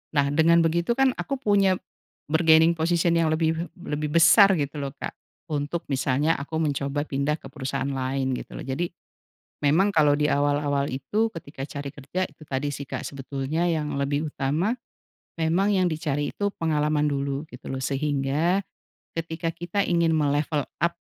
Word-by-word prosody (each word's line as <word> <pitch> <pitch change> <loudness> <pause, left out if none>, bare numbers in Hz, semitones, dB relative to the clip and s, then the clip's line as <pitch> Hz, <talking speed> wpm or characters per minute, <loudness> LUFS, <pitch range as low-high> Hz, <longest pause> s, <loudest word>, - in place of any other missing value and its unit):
nah, 140 -1 +3
dengan 165 +2 +5
begitu 170 +8 +1
kan 270 -1 +4
aku 275 - -2
punya 200 -6 +3 0.6
bargaining 160 0 +6
position 170 +1 +1
yang 165 - +3
lebih 160 +1 0
lebih 150 -4 -3
besar 195 +4 +7
gitu 145 0 -3
loh, 135 -1 -5
Kak, - - -5 0.4
untuk 150 +3 -2
misalnya 135 +4 +1
aku 150 +3 -6
mencoba 145 -2 -1
pindah 140 +1 -1
ke 135 - -11
perusahaan 135 -1 -3
lain 130 0 -1
gitu - - -6
loh. - - -6
Jadi, 150 +7 -2 0.7
memang 160 +8 +3
kalau 150 -4 +4
di 150 0 +1
awal-awal 145 0 +1
itu 140 - 0
ketika 140 -4 -7
cari 140 -1 -5
kerja, 150 +6 -3
itu 150 +1 -16
tadi 140 0 -2
sih, 140 0 -6
Kak, - - -4
sebetulnya 140 +4 -2
yang 155 -4 -1
lebih 145 +2 -1
utama, 150 +10 0 0.6
memang 175 +5 +2
yang 185 -1 +3
dicari 145 -2 -1
itu 205 - -1
pengalaman 150 -2 +1
dulu 140 +1 -2
gitu 125 - -11
loh. 130 0 -4
Sehingga 145 +6 +1 0.6
ketika 165 0 -3
kita 175 +4 -2
ingin 170 -2 +2
me-level 145 -1 +1 0.2
up 170 - +3
150 Hz, 160 wpm, -25 LUFS, 140-170 Hz, 0.7 s, besar